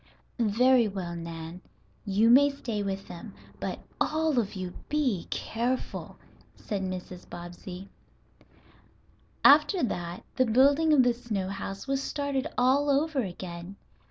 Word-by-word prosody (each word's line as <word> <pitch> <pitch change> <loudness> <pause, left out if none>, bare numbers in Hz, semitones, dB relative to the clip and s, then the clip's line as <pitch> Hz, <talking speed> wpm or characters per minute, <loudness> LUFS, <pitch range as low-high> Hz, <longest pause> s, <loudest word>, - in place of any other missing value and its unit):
"Very 240 +2 +4
well, 185 -4 -4
Nan, 165 +1 -7 0.5
you 210 +4 +4
may 285 +3 +7
stay 240 -7 -4
with 195 -1 -3
them. 185 +4 -9 0.2
But - - -4 0.2
all 310 -3 +2
of 205 -4 -2
you 185 -1 -5 0.2
be 265 - 0
careful," 245 +3 -3 0.4
said 205 -3 -4
Mrs. 185 -1 -6
Bobbsey. 175 +2 -8 1.6
After 300 +5 +6
that 175 -6 -3
the 255 - +3
building 280 +7 +4
of 285 -4 +6
the 245 -1 +3
snow 215 -6 -3
house 195 0 -5
was 275 0 0
started 285 0 -2
all 270 +4 +3
over 290 +1 +2
again. 175 -2 -7
225 Hz, 130 wpm, -28 LUFS, 185-275 Hz, 1.6 s, may